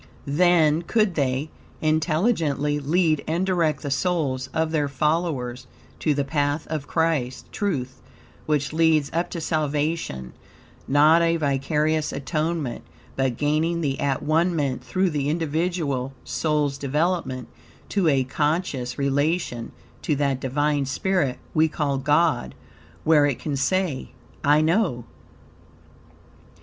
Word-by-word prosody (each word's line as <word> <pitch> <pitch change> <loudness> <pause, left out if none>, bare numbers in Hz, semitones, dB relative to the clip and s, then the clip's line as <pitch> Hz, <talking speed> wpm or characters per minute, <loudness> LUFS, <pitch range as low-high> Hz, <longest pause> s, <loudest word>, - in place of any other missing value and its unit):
Then 160 +1 +3
could 210 +2 +1
they, 140 0 -1 0.3
intelligently, 155 - +1
lead 155 +1 +1
and 170 +4 0
direct 170 -5 +1
the 145 - -3
souls 140 -5 0
of 160 0 0
their 150 -3 +1
followers 140 -4 -1 0.3
to 150 -3 +1
the 140 - +1
path 145 +1 0
of 150 -2 -3
Christ 160 -7 0
(Truth), 140 - -3 0.5
which 150 -1 0
leads 160 -3 +3
up 170 +2 0
to 175 - -5
salvation; 150 - -2 0.5
not 150 +4 +5
a 165 0 +2
vicarious 150 +2 0
atonement, 155 -2 -2 0.3
but 135 -3 0
gaining 155 +3 +1
the 135 -4 -1
at 135 -2 0
one 165 +3 +2
ment 135 -5 -1
through 185 +9 0
the 145 -1 -1
individual 155 -4 -1
soul's 150 -3 -1
development 145 -2 -1 0.4
to 195 -4 +1
a 135 -4 +3
conscious 145 -2 -1
relation, 140 -2 0 0.3
to 150 - 0
that 140 -2 0
Divine 145 +1 0
spirit, 150 -3 0 0.2
we 160 0 +4
call 145 -3 -1
God, 150 -1 +1 0.5
where 150 -2 +5
it 140 - -1
can 150 -3 -3
say 145 +1 -1 0.3
"I 150 +1 +5
know." 160 - +1
150 Hz, 125 wpm, -24 LUFS, 140-165 Hz, 0.5 s, not